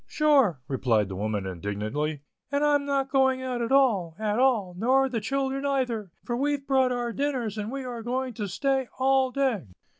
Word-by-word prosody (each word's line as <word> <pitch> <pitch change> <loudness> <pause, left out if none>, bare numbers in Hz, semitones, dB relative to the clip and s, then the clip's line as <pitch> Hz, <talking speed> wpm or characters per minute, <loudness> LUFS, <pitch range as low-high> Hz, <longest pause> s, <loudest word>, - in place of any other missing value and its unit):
"Sure," 275 - +3
replied 115 -7 +1
the 95 - -5
woman, 105 0 -2
indignantly, 105 - -3 0.3
"an' 285 +1 +1
I'm 290 -1 +3
not 275 -1 0
going 265 -1 +2
out 250 -2 -2
at 235 - -2
all, 215 -12 +3
at 215 +1 -1
all, 230 -9 +2
nor 260 +7 +3
the 240 -4 -3
children 270 +3 -1
aither, 250 -7 -1 0.2
for 240 - -2
we've 280 +2 -1
brought 265 -2 +3
our 240 -1 -2
dinners 260 -6 -2
and 210 +1 -4
we 270 0 -4
are 245 -2 -5
going 250 +2 -2
to 210 -2 -4
stay 265 +7 0
all 265 0 +3
day." 255 - -1
250 Hz, 185 wpm, -26 LUFS, 200-270 Hz, 0.3 s, Sure